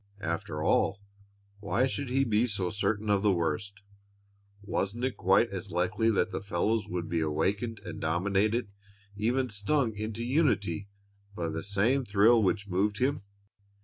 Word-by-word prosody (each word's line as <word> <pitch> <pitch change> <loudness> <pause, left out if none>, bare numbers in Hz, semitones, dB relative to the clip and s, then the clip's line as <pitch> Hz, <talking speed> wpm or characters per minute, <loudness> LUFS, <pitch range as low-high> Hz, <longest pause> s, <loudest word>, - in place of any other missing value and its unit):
After 85 0 -3
all, 100 - +2 0.6
why 105 +5 +1
should 135 0 -3
he 135 +2 +2
be 115 -1 +2
so 100 -5 -2
certain 105 +1 -1
of 100 -1 +3
the 105 -1 +3
worst? 95 +4 -2 0.8
Wasn't 105 +3 -2
it 130 -1 0
quite 95 +5 +3
as 95 0 -5
likely 95 +5 +1
that 110 - +1
the - - -3
fellows 105 +3 0
would 90 -2 -3
be 85 0 -1
awakened 100 +9 -1
and - - -7
dominated, 100 +7 0 0.4
even 120 +4 0
stung 110 +3 0
into 110 +2 -4
unity, 120 - +1 0.5
by 85 -3 -2
the 80 +1 -3
same 105 +8 +1
thrill 110 +2 +4
which 100 0 0
moved 100 +3 0
him? 140 +4 0
105 Hz, 150 wpm, -29 LUFS, 95-115 Hz, 0.8 s, thrill